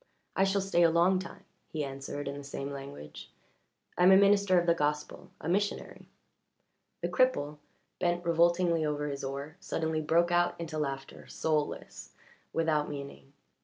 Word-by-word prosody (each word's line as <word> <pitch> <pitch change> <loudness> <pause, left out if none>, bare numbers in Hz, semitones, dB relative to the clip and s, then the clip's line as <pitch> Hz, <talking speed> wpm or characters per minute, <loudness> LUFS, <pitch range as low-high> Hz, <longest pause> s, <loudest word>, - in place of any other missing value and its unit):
"I 195 - +4
shall 195 +1 +1
stay 190 -3 +1
a 170 - +6
long 175 +3 +3
time," 180 - -9 0.2
he 155 -2 -3
answered 135 +1 -5
in 140 - -3
the 145 - -8
same 140 0 -5
language. 135 - -9 0.7
"I - - +2
am 180 +1 +7
a 190 - +9
minister 200 -2 +5
of 175 - -1
the 170 - +4
gospel 150 -1 -2
a - - -6
missionary." 200 +4 -2 1.0
The - - +2
cripple, 150 - +1 0.4
bent 175 0 0
revoltingly 170 0 +3
over 150 -1 -1
his 140 -1 -5
oar, 140 +3 -5
suddenly 160 -1 -2
broke 170 +3 +2
out 175 0 +2
into 160 -2 -4
laughter, 135 -2 -5
soulless, 155 -2 -3 0.4
without 155 -2 +1
meaning. 140 -1 -8
160 Hz, 160 wpm, -30 LUFS, 145-175 Hz, 1.0 s, a